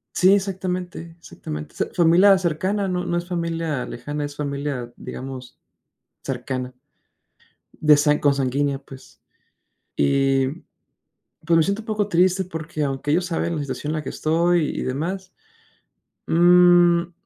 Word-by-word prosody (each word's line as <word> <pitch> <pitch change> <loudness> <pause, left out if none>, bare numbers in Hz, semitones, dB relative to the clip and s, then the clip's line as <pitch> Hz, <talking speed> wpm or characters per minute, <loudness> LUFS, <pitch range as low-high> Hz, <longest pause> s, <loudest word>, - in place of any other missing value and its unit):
Sí, 185 +2 +5
exactamente, 180 -4 -3
exactamente. 75 - -8
O - - -23
sea, - - 0
familia 180 +3 +5
cercana, 185 +4 -1
no 180 0 -2
no 175 - -1
es 175 - -4
familia 165 -5 -2
lejana, 145 +4 -5
es 145 0 -8
familia, 140 -4 -4
digamos, 130 -1 -8 0.7
cercana, 130 -1 -4 1.0
de 150 -1 +4
san 150 0 +3
consanguínea, 140 0 +1
pues. 135 -1 -15 0.8
Y, 135 - +2 1.0
pues, 165 0 +3
me 160 - +5
siento 200 +4 -1
un - - -17
poco 210 -2 -1
triste 185 +2 +3
porque, 160 -3 -5
aunque 140 +1 -2
ellos 175 +3 +2
saben 170 -1 -2
la 150 - -2
situación 140 +2 -4
en 155 - -2
la 155 - -2
que - - -5
estoy 170 +1 +1
y - - -2
demás. 175 +9 -3 1.0
Mm. 175 0 +5
165 Hz, 140 wpm, -22 LUFS, 140-180 Hz, 1.0 s, Sí